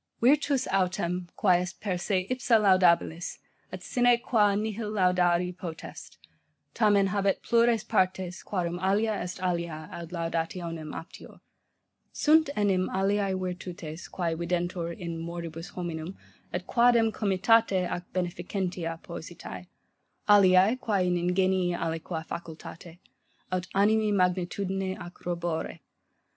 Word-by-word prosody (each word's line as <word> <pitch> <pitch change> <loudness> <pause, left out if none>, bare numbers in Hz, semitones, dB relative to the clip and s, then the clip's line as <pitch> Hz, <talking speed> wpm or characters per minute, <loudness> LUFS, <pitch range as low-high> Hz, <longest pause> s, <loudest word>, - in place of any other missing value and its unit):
'Virtus 275 +1 +3
autem, 180 -2 0
quae 180 -3 +3
est 180 - -6
per 200 -3 -2
se 185 +1 -1
ipsa 250 -2 +3
laudabilis, 180 -4 +3 0.3
et - - -7
sine 245 -2 +3
qua 215 -4 +2
nihil 215 +1 -2
laudari 180 -3 +2
potest, 170 -3 -8 0.6
tamen 205 -3 +3
habet 195 0 0
plures 235 -2 +3
partes, 190 -4 0
quarum 175 -3 -3
alia 205 +4 +1
est 180 -2 -4
alia 170 -3 -2
ad 170 -1 -7
laudationem 165 -1 -3
aptior. 165 - -10 0.7
Sunt 315 -1 +4
enim 195 -3 +1
aliae 195 0 +1
virtutes, 180 -3 -6
quae 170 -3 -1
videntur 170 0 -2
in 170 -3 -5
moribus 165 0 -6
hominum, 175 0 -5 0.3
et 180 0 -3
quadam 235 -1 +4
comitate 200 -1 +2
ac 175 - -4
beneficentia 175 -1 -3
positae: - - -8 0.6
aliae 200 +3 +6
quae 200 -6 +1
in 180 - +1
ingenii 180 0 +1
aliqua 165 0 -3
facultate, 170 0 -8 0.5
aut 185 0 -1
animi 215 +2 +3
magnitudine 190 0 0
ac 175 -1 -8
robore. 170 -2 -3
185 Hz, 115 wpm, -28 LUFS, 175-205 Hz, 0.7 s, aliae